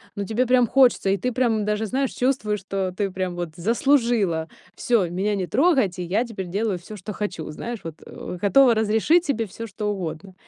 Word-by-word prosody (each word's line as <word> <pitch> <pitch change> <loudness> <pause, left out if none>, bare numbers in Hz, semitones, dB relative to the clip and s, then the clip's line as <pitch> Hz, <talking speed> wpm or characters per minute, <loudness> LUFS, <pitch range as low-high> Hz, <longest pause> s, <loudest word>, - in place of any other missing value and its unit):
ну, 200 -1 -3
тебе 230 +4 0
прям 250 -2 +4
хочется, 250 -6 +4
и 195 - +2
ты 250 +7 -2
прям 225 -4 +1
даже, 210 +1 -1
знаешь, 265 +4 -1
чувствуешь, 245 -5 0
что 190 -1 -3
ты 200 -2 -1
прям 185 -1 -3
вот 175 -1 -4
заслужила: 225 - +1 0.3
"Всё, 225 -7 +1
меня 195 +4 -1
не 185 -3 -2
трогать, 260 - +2
и - - -2
я 200 +7 0
теперь 195 -6 -6
делаю 200 0 -1
всё, 210 +5 -10
что 205 +2 -7
хочу". 185 -7 -4
Знаешь, 230 +8 -6
вот, 165 -2 -7
э, 180 - -8
готова 245 +4 +5
разрешить 220 +11 +2
себе 235 -6 0
всё, 230 +3 -8
что 210 0 -3
угодно. 190 0 -6
210 Hz, 200 wpm, -23 LUFS, 185-240 Hz, 0.3 s, готова